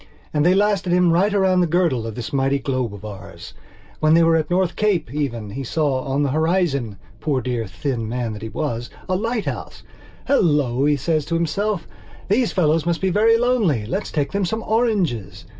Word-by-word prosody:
And 150 -1 +2
they 180 +3 +4
lasted 200 -2 +1
him 180 -1 +4
right 195 +5 +3
round 190 -2 +3
the 175 - +2
girdle 160 -9 +1
of 110 - -6
this 120 +1 -6
mighty 135 0 +2
globe 130 -4 -2
of 100 +1 -11
ours. 100 -10 -9 0.5
When 155 +1 +4
they 170 - +5
were 165 0 +4
at 155 -2 0
North 180 0 +1
Cape, 195 - 0
even, 120 -8 -3
he 135 +5 -5
saw 140 -1 0
on 140 +1 0
the 140 - 0
horizon, 155 - 0 0.2
poor 140 +2 0
dear 120 -3 -3
thin 115 +2 -3
man 120 -2 -2
that 105 - -8
he 110 - -5
was, 120 -4 -3 0.2
a 185 - 0
lighthouse. 225 +3 -3 0.4
"Hello," 145 - +2
says 155 +2 0
he - - -12
to 170 - 0
himself, 175 +4 -1 0.4
"these 230 +3 +2
fellows 160 -3 +2
must 170 -1 +1
be 190 -1 0
very 225 +4 +4
lonely. 225 - +1
Let's 190 - -3
take 145 -3 -1
them 200 0 0
some 220 +5 -2
oranges." 175 - -1
155 Hz, 195 wpm, -21 LUFS, 125-190 Hz, 0.5 s, they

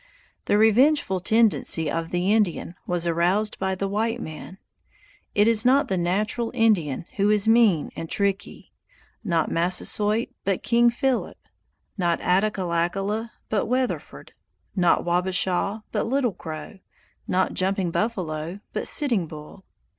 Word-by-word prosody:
The 205 - +2
revengeful 220 -1 +3
tendency 215 -6 +2
of 165 +2 -2
the 180 +3 +1
Indian 200 -5 0
was 175 -1 0
aroused 175 +6 0
by 190 0 -1
the 195 +1 -2
white 225 +4 -1
man. 160 +1 -8 0.8
It 205 +1 +4
is 225 -1 +4
not 270 +2 +3
the 190 - 0
natural 210 +7 0
Indian 185 - +1
who 200 +1 +2
is 210 0 +2
mean 225 -8 +3
and 165 - -6
tricky; 200 -2 -2 0.5
not 170 -6 0
Massasoit 205 +6 0
but 195 -2 -1
King 235 0 +4
Philip; 255 +2 -1 0.6
not 175 -2 +1
Attackullakulla 195 +2 0 0.2
but 215 -1 -1
Weatherford; 255 +2 -3 0.4
not 175 -3 +2
Wabashaw 185 +3 0
but 215 0 -1
Little 250 -3 0
Crow; 160 +5 -8 0.5
not 185 +1 0
Jumping 190 -1 0
Buffalo 175 -5 -3
but - - -1
Sitting 235 - +2
Bull! 155 +5 -11
195 Hz, 130 wpm, -24 LUFS, 175-225 Hz, 0.8 s, It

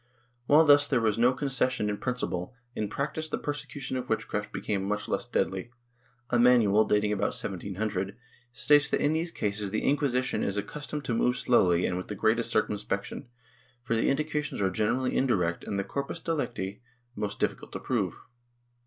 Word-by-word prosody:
^ - - -40 0.4
While 155 +3 +6
thus 145 0 +6
there - - +2
was 110 -1 +1
no 120 +2 +5
concession 130 -4 0
in 105 0 -1
principle, 125 -5 -3 0.2
in 105 - -2
practice 155 +6 -3
the - - -1
persecution 145 -2 -4
of 125 0 -5
witchcraft - - -2
became 100 -2 -2
much 105 +1 -2
less - - -1
deadly. 95 +4 -1 0.6
A 120 - +3
manual, 115 -4 +5
dating 105 0 +2
about 100 -1 0
1700, 100 +1 -3 0.3
states 145 +3 +4
that - - +1
in 145 - +2
these 165 +2 0
cases 105 -8 -2
the 110 - -2
Inquisition 135 -3 +1
is 100 0 -1
accustomed 145 +6 -4
to 120 - -1
move 125 +2 +2
slowly 90 -8 +3
and 90 - -1
with 90 - -5
the 105 - -5
greatest 115 +3 +2
circumspection, 105 +3 -2 0.6
for 115 - 0
the 115 - +2
indications 150 +1 -1
are 95 -2 +1
generally 115 +6 0
indirect 90 -10 +1
and 100 - -3
the 100 - 0
corpus 140 +8 -4
delicti 125 - -3 0.3
most 105 -1 -3
difficult - - -2
to - - -4
prove. - - -1
115 Hz, 175 wpm, -28 LUFS, 100-140 Hz, 0.6 s, While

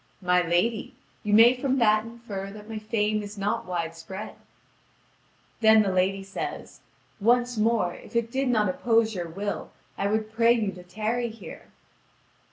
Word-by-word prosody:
"My 180 0 +4
lady, 175 +7 0 0.3
you 210 - -3
may 225 +4 +8
from 265 +1 0
that 215 -3 +3
infer 230 -4 -7
that 210 +1 -11
my 220 -1 -5
fame 215 -1 0
is 205 0 -8
not 200 -1 -2
widespread." 170 +3 -5 1.3
Then 220 -1 +6
the 195 - 0
lady 190 +1 +1
says: 195 0 -6 0.4
"Once 245 +3 +2
more, 215 -5 +1
if - - -13
it 235 0 0
did 270 +1 0
not 220 -4 +2
oppose 225 +3 +2
your 175 -3 -4
will, 200 +5 -4 0.3
I 200 - +1
would 215 +1 -1
pray 230 +1 +5
you 220 -4 0
to 180 -1 -11
tarry 215 +6 -2
here." 225 +1 -11
215 Hz, 160 wpm, -26 LUFS, 195-230 Hz, 1.3 s, may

